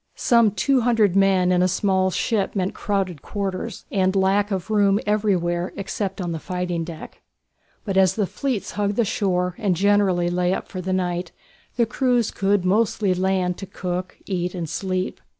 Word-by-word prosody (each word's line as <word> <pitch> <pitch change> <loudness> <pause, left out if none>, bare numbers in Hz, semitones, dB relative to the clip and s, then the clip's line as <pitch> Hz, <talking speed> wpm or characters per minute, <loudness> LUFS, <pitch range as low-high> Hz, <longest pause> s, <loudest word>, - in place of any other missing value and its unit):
Some 235 -2 +4
two 245 +7 +1
hundred 225 -5 +2
men 190 -2 +3
in 180 0 +3
a 185 - +4
small 190 0 +1
ship 205 +2 -1
meant 190 -1 -1
crowded 190 -7 -2
quarters, 200 +1 -4
and 190 -1 +1
lack 195 +2 +2
of 195 +1 -3
room 205 -1 +3
everywhere 185 -4 0
except 195 0 -4
on 175 -2 -2
the 165 - -3
fighting 180 -1 -3
deck. 165 -1 -9 0.6
But 195 -3 -1
as 190 -2 +4
the 210 -3 +1
fleets 255 +1 -3
hugged 205 -1 -1
the 235 - +2
shore, 180 -3 0
and 200 -5 +1
generally 190 -2 +2
lay 180 +1 +1
up - - -6
for 185 - -6
the 185 +1 -3
night, 180 -2 -1 0.4
the 235 - +3
crews 245 -1 +1
could 195 -1 +1
mostly 205 0 +2
land 185 -1 0
to 195 - -7
cook, 180 -1 -4
eat, 180 -2 -2
and 170 -2 -3
sleep. 185 +3 -3
190 Hz, 175 wpm, -23 LUFS, 180-205 Hz, 0.6 s, Some